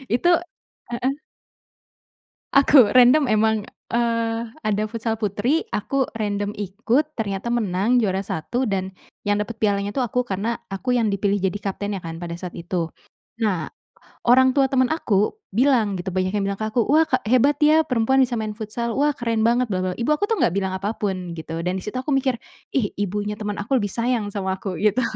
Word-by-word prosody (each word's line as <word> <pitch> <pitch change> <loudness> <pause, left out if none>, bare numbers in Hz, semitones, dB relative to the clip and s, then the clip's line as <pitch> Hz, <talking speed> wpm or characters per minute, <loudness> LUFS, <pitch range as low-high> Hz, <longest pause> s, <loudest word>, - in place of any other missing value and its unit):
itu 350 +8 +2 0.6
heeh. 255 +3 0 1.4
Aku, 275 -4 +7
random 255 +3 +6
emang, 215 -1 +2 0.2
eee, 230 -1 0 0.2
ada 210 0 0
futsal 225 0 -3
putri, 225 - 0
aku 265 +5 -1
random 205 -1 -2
ikut, 225 - 0
ternyata 205 +1 -2
menang 220 +1 +1
juara 195 -3 0
1 220 +10 -2
dan 190 -4 -2 0.3
yang 205 - +3
dapet 225 0 -9
pialanya 200 -1 +1
tuh 275 - -3
aku, 250 +3 0
karena 220 +2 -2 0.2
aku 245 +6 -1
yang 225 -4 +2
dipilih 200 0 +1
jadi 190 +2 0
kaptennya 200 0 -3
kan 165 -2 -7
pada 170 0 -5
saat 180 -2 -7
itu. 170 -1 -2 0.6
Nah, 185 -7 0 0.6
orang 260 +2 +5
tua 270 -2 +3
temen 255 -1 +3
aku 215 - 0 0.2
bilang, 230 -5 +3
gitu, 185 +2 -4
banyak 185 0 0
yang 200 - 0
bilang 200 +1 -3
ke 215 - 0
aku, 235 +2 +1
"Wah 310 +2 +5
ka - - +2
hebat 255 +5 +3
ya, 310 +1 +6
perempuan 260 0 +2
bisa 245 -2 -1
main 215 -1 -3
futsal. 230 +1 -3
Wah, 295 +2 +3
keren 230 -2 0
banget 245 +2 +3
bla 185 -2 -1
bla." 185 - -1
Ibu 235 - -2
aku 405 - 0
tuh 450 - +1
gak 175 - +3
bilang 190 -1 0
apa 200 +3 -2
pun 185 -4 -3
gitu 160 +1 -5
dan 180 +1 0
disitu 210 +6 -5
aku 275 +2 -2
mikir, 260 -2 +1 0.4
"Ih, 230 -7 0
ibunya 205 +1 -2
temen 210 -1 -4
aku 230 +7 0
lebih 205 -4 -1
sayang 230 -2 -1
sama 190 -2 -1
aku," 190 -2 -5
gitu. 215 +4 +3
215 Hz, 185 wpm, -22 LUFS, 200-250 Hz, 1.4 s, Aku